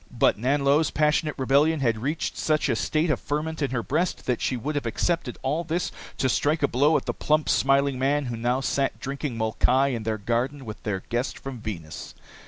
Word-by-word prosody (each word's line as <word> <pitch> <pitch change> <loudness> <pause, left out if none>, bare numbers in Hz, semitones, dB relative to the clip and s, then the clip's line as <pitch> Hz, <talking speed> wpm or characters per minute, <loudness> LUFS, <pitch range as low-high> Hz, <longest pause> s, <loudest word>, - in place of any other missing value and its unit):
But 120 - +3
Nanlo's 140 +6 +2
passionate 150 0 +1
rebellion 140 +3 +3
had 115 -4 +1
reached 150 +6 -2
such 155 -2 +1
a 120 - +2
state 155 +7 +1
of - - 0
ferment 155 +2 -3
in 140 - +1
her 125 -3 -2
breast 165 +8 -1
that 125 -3 0
she 130 - 0
would 145 +6 -3
have 145 -5 -2
accepted 135 +2 -1
all 150 +6 0
this 170 +1 -2 0.3
to 130 - +1
strike 145 +4 +1
a - - +5
blow 145 +6 +3
at - - -4
the - - -1
plump, 155 0 +1
smiling 135 -1 +2
man 140 +2 +1
who 120 -2 -3
now 120 +3 0
sat 135 0 0
drinking 140 -2 -4
molkai 125 +5 +2
in 120 -4 -2
their 110 0 -2
garden 125 +6 -2
with 110 -1 -8
their 95 -3 -3
guest 120 +2 -1
from 135 -3 -7
Venus. 85 -9 -7
135 Hz, 205 wpm, -25 LUFS, 120-150 Hz, 0.3 s, a